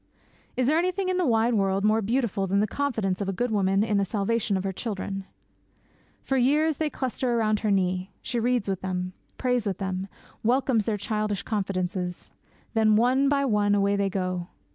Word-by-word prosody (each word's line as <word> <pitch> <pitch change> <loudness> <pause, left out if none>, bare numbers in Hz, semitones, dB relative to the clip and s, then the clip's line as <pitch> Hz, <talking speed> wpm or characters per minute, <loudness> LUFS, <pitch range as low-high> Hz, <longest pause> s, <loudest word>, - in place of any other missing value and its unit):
Is 255 - +2
there 305 +5 +3
anything 370 +2 0
in 370 - +1
the 360 -4 +1
wide 230 0 +3
world 195 -2 +1
more 215 +1 +3
beautiful 220 -3 0
than 195 +2 +2
the 210 - +3
confidence 215 -6 -1
of 195 - -1
a - - +1
good 240 +5 -1
woman 195 -1 +2
in 210 -2 +1
the - - +2
salvation 205 +1 0
of 190 - -3
her 195 - -1
children? 195 -2 -4 1.0
For 270 - 0
years 295 +4 +3
they 310 -1 0
cluster 255 -3 -1
round 215 -2 +2
her 215 - -1
knee; 185 -1 +1
she 240 0 -2
reads 245 -2 +1
with 190 -2 -2
them; 185 -1 -3 0.2
prays 250 -4 0
with 195 - -1
them; 190 0 -3 0.3
welcomes 240 -2 +2
their 215 -2 0
childish 210 0 -2
confidences. 185 -3 -3 0.4
Then, 220 -2 +4
one 255 +5 +3
by 280 -1 +2
one, 205 -4 +2
away 200 0 +2
they 200 -1 +1
go! 185 -2 -2
210 Hz, 190 wpm, -26 LUFS, 195-245 Hz, 1.0 s, Then